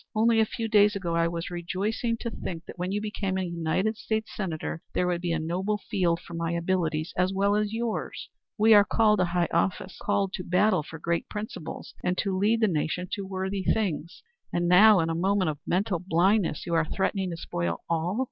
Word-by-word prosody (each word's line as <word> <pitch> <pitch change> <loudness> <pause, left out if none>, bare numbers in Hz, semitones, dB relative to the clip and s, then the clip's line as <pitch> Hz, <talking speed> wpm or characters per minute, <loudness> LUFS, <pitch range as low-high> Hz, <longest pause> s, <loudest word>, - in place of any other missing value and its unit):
Only 225 +1 +4
a 220 - +5
few 225 +1 -3
days 210 -1 +4
ago 175 -4 -2
I 165 0 +3
was 170 +1 -4
rejoicing 200 +7 -2
to 235 - -3
think 170 -5 -6
that - - -11
when 180 +1 -2
you 205 - 0
became 210 -3 -2
a 190 - -1
United 175 +5 -1
States 220 -1 -2
Senator, 165 -4 -4
there 180 - +2
would 175 -1 -1
be 175 -1 -1
a 165 - +1
noble 180 +6 -1
field 175 -4 0
for 170 - -11
my 165 0 -2
abilities 170 -2 -1
as 180 +1 +2
well 200 +1 +2
as 210 0 0
yours. 225 0 -3 0.3
We 220 +1 +6
are 205 -1 +8
called 210 0 +3
to 180 - +4
high 175 0 0
office, 190 -1 -1
called 200 -1 0
to 180 - -4
battle 185 +1 +3
for 160 +2 -9
great 170 +1 -2
principles 210 -6 -6
and 180 0 0
to 195 -2 0
lead 215 +4 +2
the 220 - +5
nation 175 +1 -1
to 200 -2 -4
worthy 190 +1 -3
things. 180 -7 -1 0.3
And 175 0 0
now, 195 +2 +7
in 165 0 0
a - - 0
moment 185 0 +1
of 145 - -9
mental 185 -1 0
blindness, 180 0 +2
you 170 - -3
are 165 -1 +3
threatening 190 +2 -1
to 170 - -5
spoil 85 - -3
all. 170 +4 -1
185 Hz, 215 wpm, -27 LUFS, 170-210 Hz, 0.3 s, are